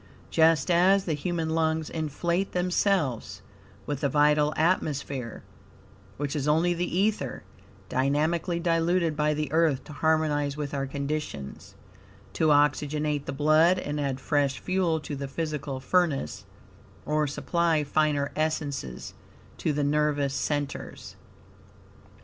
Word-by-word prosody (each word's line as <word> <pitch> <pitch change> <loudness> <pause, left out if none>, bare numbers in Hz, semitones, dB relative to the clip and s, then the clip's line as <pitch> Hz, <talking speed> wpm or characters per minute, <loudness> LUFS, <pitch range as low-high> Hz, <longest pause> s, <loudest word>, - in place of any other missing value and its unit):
Just 165 +2 +4
as 185 +3 +4
the 165 - 0
human 160 +1 -2
lungs 160 -1 0
inflate 170 +4 -2
themselves 180 - 0 0.4
with 145 -2 -3
the 140 - +1
vital 150 +1 +3
atmosphere, 145 -7 -1 0.7
(which 145 +1 -3
is 145 -1 -1
only 165 +4 +3
the 175 0 -2
ether, 195 - 0 0.4
dynamically 155 +7 0
diluted 170 -1 +1
by 150 0 +1
the 150 -2 -3
Earth 160 -4 +2
to 150 - -11
harmonize 150 -2 +1
with 145 -1 -4
our 135 -1 -2
conditions), 140 - -5 0.6
to 160 - +1
oxygenate 150 0 +2
the - - -4
blood 155 +5 +4
and 150 -4 -3
add 135 -2 -2
fresh 140 -1 0
fuel 180 -3 0
to 145 -1 -6
the 140 0 -5
physical 145 -2 -4
furnace, 150 - 0 0.6
or 150 0 +1
supply 165 +2 0
finer 145 -1 +1
essences 145 - -3 0.5
to 155 - 0
the 145 0 -1
nervous 145 -1 +1
centers. 145 -1 -4
150 Hz, 125 wpm, -27 LUFS, 145-165 Hz, 0.7 s, Just